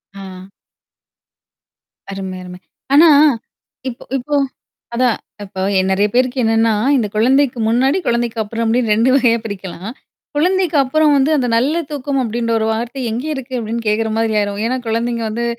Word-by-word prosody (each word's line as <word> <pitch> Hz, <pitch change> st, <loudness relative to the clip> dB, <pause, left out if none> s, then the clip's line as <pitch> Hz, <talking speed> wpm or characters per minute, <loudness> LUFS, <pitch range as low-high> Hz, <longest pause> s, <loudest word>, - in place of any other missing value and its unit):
ஆ. 190 Hz, -1 st, -10 dB, 1.6 s
அருமை 190 Hz, -1 st, -5 dB
அருமை. 180 Hz, 0 st, -10 dB, 0.3 s
ஆனா, 320 Hz, +3 st, +7 dB, 0.8 s
இப்போ 240 Hz, -, -10 dB
இப்போ 290 Hz, +4 st, -3 dB, 0.6 s
அதான் 245 Hz, -2 st, +2 dB, 0.3 s
இப்போ 190 Hz, -1 st, -7 dB, 0.2 s
என் 190 Hz, 0 st, 0 dB
நெறையா 205 Hz, +2 st, +2 dB
பேருக்கு 255 Hz, +1 st, +1 dB
என்னான்னா, 225 Hz, 0 st, +2 dB, 0.2 s
இந்தக் 215 Hz, -5 st, -1 dB
குழந்தைக்கு 255 Hz, +3 st, +2 dB
முன்னாடி, 265 Hz, +8 st, +2 dB
குழந்தைக்கு 235 Hz, -1 st, 0 dB
அப்புறம் 230 Hz, +2 st, -3 dB
அப்டின்னு 230 Hz, -1 st, +1 dB
2 230 Hz, +4 st, +3 dB
வகையா 240 Hz, -4 st, +3 dB
பிரிக்கலாம். 195 Hz, -1 st, -6 dB, 0.5 s
குழந்தைக்கு 360 Hz, 0 st, +1 dB
அப்புறம் 300 Hz, +3 st, +2 dB
வந்து, 275 Hz, +2 st, +3 dB
"அந்த 250 Hz, -3 st, 0 dB
நல்ல 270 Hz, +8 st, +1 dB, 0.2 s
தூக்கம் 280 Hz, -1 st, -2 dB
அப்டின்ற 230 Hz, 0 st, -2 dB
ஒரு 220 Hz, -, 0 dB
வார்த்தை 235 Hz, +4 st, -4 dB
எங்க 240 Hz, +6 st, -3 dB
இருக்கு?" 260 Hz, -2 st, -7 dB
அப்படின்னு 230 Hz, +1 st, -3 dB
கேக்குற 220 Hz, +1 st, +1 dB
மாதிரி 225 Hz, -1 st, 0 dB
ஆயிரும். 205 Hz, 0 st, -2 dB
ஏன்னா, 255 Hz, +3 st, 0 dB
குழந்தைங்க 230 Hz, +1 st, -1 dB
வந்து 235 Hz, +2 st, -3 dB
235 Hz, 150 wpm, -17 LUFS, 215-260 Hz, 1.6 s, ஆனா